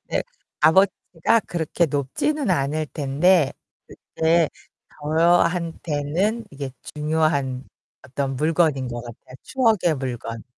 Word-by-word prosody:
네. - - 0 0.4
값어치가 185 +4 +3
그렇게 170 0 0
높지는 160 - -1
않을 155 -1 0
텐데 150 +3 +2 0.6
그게 165 0 +3 0.5
저한테는 170 +4 +1
이게 140 -2 -6 0.2
중요한 150 -4 0 0.4
어떤 135 +1 -3
물건인 155 -3 +1
것 120 -1 -5
같아요. 120 +2 -12
추억의 220 - +2
물건. 120 -3 -5
155 Hz, 225 characters per minute, -23 LUFS, 135-175 Hz, 0.6 s, 값어치가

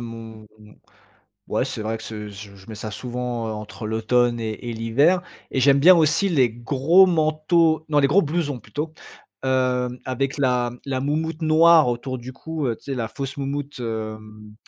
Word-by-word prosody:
mon 115 -2 -9 1.0
ouais, - - 0
c'est - - -5
vrai 110 +1 -2
que 110 - -12
c'est 105 -1 -7
je 100 0 -11
je 95 +1 -17
mets 110 - -8
ça 110 +1 -6
souvent, 120 0 -4
heu, 110 - -3
entre 105 +1 -7
l'automne 120 +2 +1
et 110 -1 -3 0.2
et - - -4
l'hiver 140 +11 +2 0.3
et 130 - -1
j'aime 140 +1 +5
bien 180 +5 +8
aussi 165 +5 +2
les 135 -8 +3
gros 140 +10 +4
manteaux 160 -1 +2
non, 150 - +1
les 140 - +4
gros 180 +8 +4
blousons 150 -5 -2
plutôt, 155 +6 -5 0.5
hem 125 -1 0
avec 135 +2 -2
la 125 -3 +1
la 130 -2 -2
moumoute 155 +3 -2
noire 160 -1 +6
autour 125 +1 -3
du 125 +2 -8
cou, 155 +1 -4
heu, 115 - -1
tu - - -26
sais, - - -2
la 115 -3 -2
fausse 135 +4 -6
moumoute, 140 0 -4
hem, 110 -2 -6
130 Hz, 185 wpm, -23 LUFS, 115-155 Hz, 1.0 s, bien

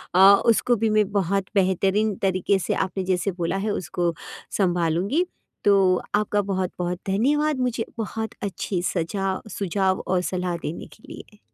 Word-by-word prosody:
अ, - - +5 0.3
उसको 240 +1 +3
भी 225 0 0
मैं 215 -2 +2
बहुत 195 -1 0
बेहतरीन 195 +2 +2
तरीके 190 +1 +1
से 175 - -1
आपने 190 0 -4
जैसे 185 +1 0
बोला 175 +1 -2
है - - +1
उसको 175 -3 -1 0.4
सँभालूँगी। 180 - +1 0.4
तो 195 -3 +4
आपका 210 0 +1
बहुत-बहुत 180 -2 -2
धन्यवाद, 285 +9 +1
मुझे 245 -3 -1
बहुत 220 0 -3
अच्छे 195 -2 -2
सजा 190 +3 -1
सुझाव 190 -1 0
और 180 0 +1
सलाह 180 -1 -2
देने 155 - -5
के 215 - -26
लिए। 210 - -12
195 Hz, 145 wpm, -24 LUFS, 180-210 Hz, 0.4 s, अ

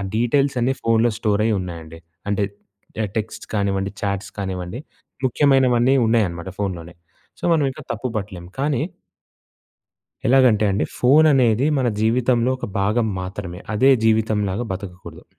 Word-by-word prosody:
డీటెయిల్సన్నీ 130 +1 +1
ఫోన్లో 115 +1 +3
స్టోరైయ్యున్నాయండి. 95 -7 -1 0.3
అంటే 100 0 +1 0.6
య - - +1
టెక్స్ట్ 110 0 -4
కానివ్వండి, 100 -1 0
చాట్స్ 100 -1 -3
కానివ్వండి, 95 +3 -4 0.5
ముఖ్యమైనవన్నీ 130 -1 +3
ఉన్నయనమాట 95 -6 0
ఫోన్లోనే. 90 -4 -4 0.4
సో, - - -22
మనవింక 145 -1 0
తప్పు 120 +3 -4
బట్టలేం, 95 -4 -6
కానీ 140 -2 0 1.5
ఎలాగంటే 125 -4 +4
అండి. 100 - 0
ఫోను 150 +5 +5
అనేది 125 +1 +3
మన 125 -2 +1
జీవితంలో 120 +2 +2
ఒక - - -4
భాగం 110 +3 +1
మాత్రమే. 95 -1 -6
అదే 130 +6 +5 0.2
జీవితంలాగా 110 -1 +1
బతకకూడదు. 90 -3 -9
110 Hz, 115 wpm, -21 LUFS, 95-125 Hz, 1.5 s, ఫోను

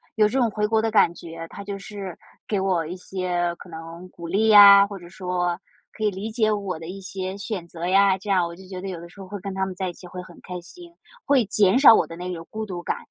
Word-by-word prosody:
有 215 -2 +4
这 260 +5 -1
种 235 -2 +3
回 210 0 0
国 220 0 +2
的 225 -1 -1
感 195 -5 +4
觉， 165 -1 -9
他 200 - -9
就 200 0 -5
是， 195 -3 -8 0.3
给 205 -3 0
我 185 -4 0
一 175 +3 -6
些 180 -2 -2
可 - - -13
能 165 +2 -9
鼓 170 -1 -9
励 210 +5 +2
呀， 200 -1 +10
或 200 -2 -8
者 175 0 -13
说， 180 -1 -2 0.3
可 215 - -7
以 210 - +2
理 200 +3 -5
解 215 -1 +1
我 200 -5 -2
的 160 - -9
一 195 +3 -7
些 185 0 -5
选 200 -4 -5
择 170 +1 -5
呀， 195 0 +4
这 205 +2 -9
样 185 -3 +3
我 170 - -9
就 190 0 -14
觉 185 -1 -7
得 195 - -6
有 180 -3 -6
的 170 - -11
时 200 - -17
候 190 - -9
会 205 +1 -6
跟 195 +1 -6
他 190 - 0
们 190 - -5
在 185 0 -2
一 - - -7
起 180 - -13
会 180 +1 -7
很 175 -2 -14
开 180 -1 -6
心， 345 - -14 0.3
会 275 -4 +4
减 205 +2 +3
少 270 -5 +9
我 - - +2
的 165 - -9
那 180 +1 -5
种 165 -1 -8
孤 220 0 -4
独 175 -2 -6
感， - - -2
190 Hz, 300 characters per minute, -24 LUFS, 175-205 Hz, 0.3 s, 呀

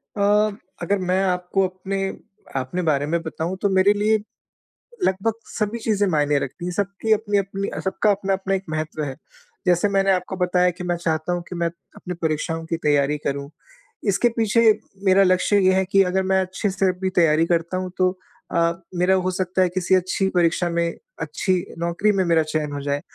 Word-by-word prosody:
अ, 200 - 0 0.6
अगर 200 0 +1
मैं 190 +1 +2
आपको 185 +1 +1
अपने 195 +1 -3 0.5
अपने 135 +8 -2
बारे 145 -4 +1
में 165 +2 -1
बताऊँ 165 +3 -4
तो 200 - +2
मेरे 190 +2 +4
लिए 215 +1 +2 0.9
लगभग 195 +4 +1 0.2
सभी 215 +2 -2
चीज़ें 205 -3 +1
मायने 145 -2 +2
रखती 155 +7 -5
है। 180 - -2
सबकी 200 +3 -2
अपनी-अपनी 200 -2 -1
सबका 205 +2 +1
अपना-अपना 195 -1 -1
एक 190 - -3
महत्व 155 0 -3
हैं। 135 -2 -4 0.5
जैसे 180 +3 +3
मैंने 195 0 +2
आपको 185 +1 -1
बताया 180 0 +2
कि 180 +1 -9
मैं 175 -1 0
चाहता 160 0 -1
हूँ 175 - -2
कि 180 - -6
मैं 170 0 0 0.3
अपनी 180 - -6
परीक्षाओं 160 +1 -1
की 165 0 -2
तैयारी 145 0 +2
करूँ। 140 0 -2 0.6
इसके 200 +5 +3
पीछे 225 +1 +3 0.4
मेरा 195 +1 +6
लक्ष्य 185 +2 +3
ये 185 0 +4
है 190 0 +2
कि 195 0 +6
अगर 190 +1 0
मैं 190 0 +2
अच्छे 190 +3 -2
से 190 0 +1
भी 190 0 0
तैयारी 165 -2 +4
करता 170 +1 0
हूँ 185 -1 -4
तो 185 0 +1 0.4
अ, 170 0 +3 0.2
मेरा 180 +2 +3
हो 185 0 0
सकता 185 0 -1
है 185 - +3
किसी 185 +1 +1
अच्छी 185 +1 +1
परीक्षा 175 0 +2
में 170 0 0 0.3
अच्छी 185 - -1 0.3
नौकरी 170 +5 +1
में 195 -2 +1
मेरा 165 -1 +3
चयन 155 -1 -2
हो 140 - -4
जाए। 145 0 -1
185 Hz, 185 wpm, -22 LUFS, 170-195 Hz, 0.9 s, मेरा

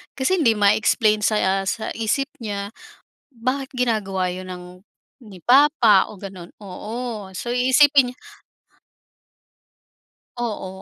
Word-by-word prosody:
Kasi 335 +8 0
hindi 230 -7 +3
ma-explain 215 +1 +2
sa 195 -2 +1
sa 220 - -3
isip 230 +5 -1
niya 205 -2 -5 0.6
bakit 260 +4 -3
ginagawa 210 -7 -1
yun 185 +1 -6
ng 180 -1 -8 0.6
ni 195 -5 -13
papa 250 - +4
o 205 - -13
gano'n. 185 -3 -10
Oo. 215 +1 -7
So, 190 - -7
iisipin 260 +2 +4
niy 250 - -20 2.2
Oo, 220 -5 -3
220 Hz, 110 wpm, -21 LUFS, 195-250 Hz, 2.2 s, papa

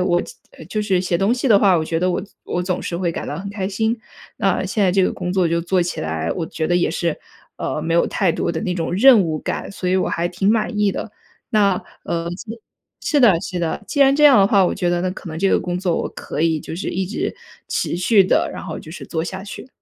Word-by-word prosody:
我 175 -1 +2 0.5
就 215 - -1
是 190 -3 +1
写 175 -2 0
东 195 +4 +2
西 255 - -2
的 210 - +7
话， 195 -3 +4
我 160 - 0
觉 165 0 -1
得 185 +1 +2
我 180 - -1 0.2
我 175 - -2
总 180 0 -2
是 170 - -3
会 175 -1 -1
感 - - -5
到 145 - -4
很 200 +2 -6
开 200 -2 -3
心， 220 +3 -1 0.4
那 - - +1
现 215 - -1
在 185 - +4
这 195 - +3
个 - - +1
工 180 -1 -4
作 185 -2 +2
就 170 +1 +1
做 180 +1 +1
起 175 - -3
来， 80 +1 -2
我 165 - -3
觉 160 -1 -3
得 175 - +2
也 175 -3 +1
是， 170 -1 -1 0.4
呃， 155 - -3
没 165 +1 -1
有 170 - +4
太 190 -5 +1
多 170 - -1
的 160 - -3
那 180 - -1
种 165 -1 -2
任 240 +3 +7
务 160 -2 -2
感， - - -4
所 185 - -3
以 185 - +2
我 185 - +1
还 170 +1 -1
挺 195 +3 +1
满 215 -1 0
意 205 -1 +3
的。 220 - -5 0.4
那， 200 -4 +2 0.2
呃 170 0 -2
是 220 +5 -8 0.4
是 295 - +1
的， 195 -9 +5
是 185 -5 -4
的， 170 +4 -2
既 285 - -2
然 275 0 +6
这 300 +1 +3
样 275 -6 +8
的 195 - +6
话， 200 -1 +4
我 - - -1
觉 175 -1 0
得 175 - 0
那 185 - 0
可 185 - -8
能 155 - -5
这 195 +2 +2
个 - - +3
工 180 0 -3
作 180 -3 0
我 - - -2
可 150 - -6
以 160 -2 +2
就 160 - -7
是 190 - -3
一 190 0 -2
直 210 - -3 0.3
持 - - -1
续 195 +3 +4
地， - - +2
然 - - -7
后 - - -5
就 155 - -11
是 - - -8
做 160 -1 -2
下 190 +2 -6
去。 205 - -8
185 Hz, 290 characters per minute, -20 LUFS, 170-200 Hz, 0.5 s, 样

